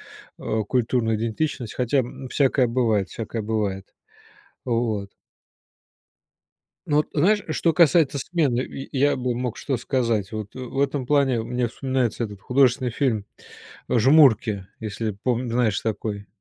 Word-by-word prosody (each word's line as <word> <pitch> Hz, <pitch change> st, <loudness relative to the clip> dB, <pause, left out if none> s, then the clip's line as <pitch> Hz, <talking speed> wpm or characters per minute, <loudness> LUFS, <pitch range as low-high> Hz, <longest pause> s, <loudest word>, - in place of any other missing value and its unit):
э, 110 Hz, -1 st, -4 dB
культурной 120 Hz, -2 st, +1 dB
идентичностью. 115 Hz, +2 st, -3 dB
Хотя, 125 Hz, +2 st, +2 dB
м, 130 Hz, +1 st, -5 dB
всякое 130 Hz, -2 st, +2 dB
бывает, 110 Hz, -6 st, +1 dB
всякое 115 Hz, +2 st, -5 dB
бывает. 105 Hz, -3 st, -2 dB, 0.8 s
Вот. 115 Hz, -5 st, -1 dB, 1.8 s
Ну, 150 Hz, -3 st, +1 dB
вот 150 Hz, -, +2 dB
знаешь, 200 Hz, +7 st, +3 dB
что 165 Hz, +2 st, +1 dB
касается 160 Hz, -3 st, +4 dB
смены, 140 Hz, -4 st, 0 dB
и 135 Hz, -, -7 dB
и 135 Hz, -, -6 dB
я 145 Hz, +2 st, +3 dB
бы 125 Hz, -1 st, -1 dB
мог 125 Hz, -2 st, -3 dB
что 135 Hz, -, -2 dB
сказать? 115 Hz, -4 st, -1 dB
Вот, 110 Hz, -2 st, -6 dB
э, -, -, -7 dB
в 130 Hz, +2 st, -4 dB
этом 140 Hz, -2 st, 0 dB
плане 135 Hz, -5 st, +2 dB
мне 125 Hz, +1 st, -1 dB
вспоминается 125 Hz, -2 st, -1 dB
этот 105 Hz, -2 st, -8 dB
художественный 125 Hz, 0 st, +2 dB
фильм, 110 Hz, -5 st, -1 dB, 0.6 s
э, 120 Hz, -, +2 dB
"Жмурки", 115 Hz, -7 st, +4 dB
если 110 Hz, +1 st, -3 dB
пом 120 Hz, +4 st, -2 dB
знаешь 115 Hz, -3 st, +1 dB
такой. 105 Hz, -2 st, -3 dB
120 Hz, 145 wpm, -23 LUFS, 110-135 Hz, 1.8 s, касается